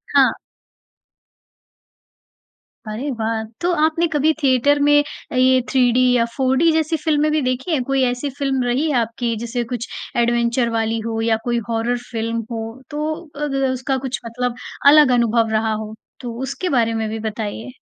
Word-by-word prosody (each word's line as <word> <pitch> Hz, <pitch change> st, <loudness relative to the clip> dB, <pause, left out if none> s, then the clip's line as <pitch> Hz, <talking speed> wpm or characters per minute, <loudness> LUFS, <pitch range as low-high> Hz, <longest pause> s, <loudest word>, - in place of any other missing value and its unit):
हाँ। -, -, +6 dB, 2.5 s
अरे 230 Hz, +7 st, -4 dB
वाह! 220 Hz, 0 st, -1 dB, 0.2 s
तो 350 Hz, +1 st, +1 dB
आपने 330 Hz, +2 st, +1 dB
कभी 310 Hz, 0 st, +2 dB
थिएटर 275 Hz, +1 st, +3 dB
में 290 Hz, 0 st, +5 dB, 0.3 s
अ, -, -, -4 dB
ये 255 Hz, 0 st, +5 dB
3D 250 Hz, -2 st, +3 dB, 0.2 s
या 230 Hz, -1 st, +3 dB
4D 265 Hz, +5 st, +3 dB
जैसी 320 Hz, 0 st, +1 dB
फ़िल्में 305 Hz, -1 st, +1 dB
भी 310 Hz, -, +1 dB
देखी 255 Hz, +5 st, -2 dB
है? 310 Hz, -, +2 dB
कोई 270 Hz, +1 st, +1 dB
ऐसी 250 Hz, +4 st, -3 dB
फ़िल्म 270 Hz, -3 st, 0 dB
रही 255 Hz, +6 st, 0 dB
है 270 Hz, -, +2 dB
आपकी 230 Hz, +1 st, -2 dB
जैसे 235 Hz, +2 st, -3 dB
कुछ 240 Hz, -1 st, -3 dB, 0.3 s
एडवेंचर 235 Hz, 0 st, +2 dB
वाली 225 Hz, 0 st, 0 dB
हो 225 Hz, -1 st, -2 dB
या 225 Hz, -1 st, +2 dB
कोई 240 Hz, -1 st, +1 dB
हॉरर 230 Hz, +2 st, 0 dB
फ़िल्म 230 Hz, -1 st, -2 dB
हो 225 Hz, +2 st, -5 dB
तो 300 Hz, +1 st, -2 dB, 0.2 s
अग 295 Hz, -1 st, -3 dB
अ, 265 Hz, -, +2 dB
उसका 260 Hz, +1 st, -1 dB
कुछ 260 Hz, -, -3 dB
मतलब 245 Hz, +1 st, -3 dB, 0.3 s
अलग 295 Hz, -2 st, +7 dB
अनुभव 230 Hz, -1 st, +2 dB
रहा 220 Hz, 0 st, 0 dB
हो। 215 Hz, 0 st, -5 dB, 0.3 s
तो 240 Hz, -2 st, -6 dB
उसके 355 Hz, +7 st, -3 dB
बारे 230 Hz, -5 st, +2 dB
में 225 Hz, -1 st, -1 dB
भी 220 Hz, +1 st, -4 dB
बताइए। 220 Hz, +2 st, -5 dB
250 Hz, 170 wpm, -20 LUFS, 230-285 Hz, 2.5 s, अलग